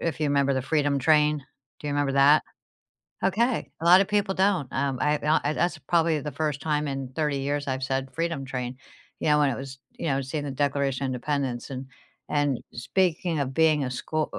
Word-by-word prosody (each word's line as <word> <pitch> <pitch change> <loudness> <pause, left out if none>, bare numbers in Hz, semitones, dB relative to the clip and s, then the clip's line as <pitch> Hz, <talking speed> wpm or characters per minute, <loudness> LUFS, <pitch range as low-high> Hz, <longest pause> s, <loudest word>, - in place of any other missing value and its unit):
if 165 -1 -2
you 150 - +1
'member 140 -1 +2
the 130 - 0
Freedom 145 0 +1
Train- 150 +1 +3 0.4
do - - -7
you 145 - -1
remember 145 -1 0
that? 140 +2 +6 0.8
Okay, 230 +5 +1
a - - -5
lotta 180 +3 +8
people 205 -1 0
don't. 190 -8 +1
Um, 135 -2 -1
I 150 0 +2
and - - -9
o 155 - +4
I 145 - +1
that's 175 0 0
probably 160 +1 +1
the 150 0 -5
first 150 -3 -2
time 150 +1 0
in 135 -1 -4
30 150 -3 0
years 145 +1 -2
I've 130 0 -2
said 135 0 -2
Freedom 165 -4 -2
Train, 125 -1 -4 0.4
you - - 0
know, 150 0 +5
when 145 -1 +4
it 125 - -3
was 135 0 -8
you - - -6
know, 135 -1 +1
seeing 140 +3 -4
the 145 - -3
Declaration 140 -1 0
of - - 0
Independence 130 -1 -2
and 130 0 -5 0.4
and 145 -4 +1
speaking 170 +5 0
of 135 -2 -1
being 155 -2 +3
a - - -2
schoo 155 +5 -2
u - - -5
145 Hz, 215 wpm, -26 LUFS, 135-155 Hz, 0.8 s, lotta